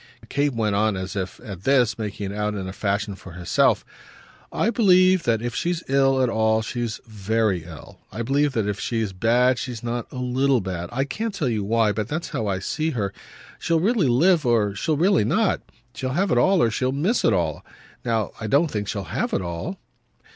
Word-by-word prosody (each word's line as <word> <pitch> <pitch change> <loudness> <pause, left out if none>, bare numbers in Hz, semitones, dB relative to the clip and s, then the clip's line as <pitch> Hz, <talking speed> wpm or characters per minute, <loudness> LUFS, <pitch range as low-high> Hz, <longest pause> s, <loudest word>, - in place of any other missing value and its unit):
Kate 140 -2 0
went 110 -2 0
on 105 -1 +1
as 95 +2 -5
if, 95 -2 -4
at 100 -7 -8
this, 125 -5 +3
making 105 -2 -4
it - - -6
out 105 0 -1
in 95 -2 -4
a 95 - -6
fashion 100 0 -1
for 95 -2 -12
herself. 85 0 +2 0.7
"I 225 - +1
believe 185 -5 +4
that 115 -1 +1
if 120 - -3
she's 175 -1 -1
ill 135 -1 +3
at - - +3
all 110 -1 +2
she's 115 -1 -3
very 110 -4 -1
ill. 80 -3 -12
I 115 - -4
believe 140 +3 +1
that 110 -4 0
if 105 -1 -2
she's 110 -4 -2
bad 120 +5 +3
she's 120 -3 -5
not 120 0 -4
a - - -10
LITTLE 125 0 +1
bad. 90 -2 -4
I 135 +3 0
can't 215 +9 -4
tell 145 -9 0
you 110 -3 -1
why, 110 +1 +2
but 105 0 -3
that's 160 +3 -3
how 110 - -2
I 95 -1 0
see 155 +11 -2
her. 100 -2 -1 0.5
She'll 165 -1 +1
really 200 - +2
live 160 +7 +4
or 115 -5 +2
she'll 150 +9 -1
really 185 +5 +3
not. 220 -3 +1 0.3
She'll 130 0 -3
have 190 +6 +1
it - - +3
all 190 -2 +4
or 115 - +2
she'll 130 +3 0
miss 170 - 0
it - - +4
all. 85 -5 -1 0.4
Now 115 -3 0
I 110 - -3
don't 145 +7 +3
think 105 -2 -3
she'll 100 -2 -3
have - - -3
it - - +1
all." 85 - -5
115 Hz, 210 wpm, -23 LUFS, 105-140 Hz, 0.7 s, believe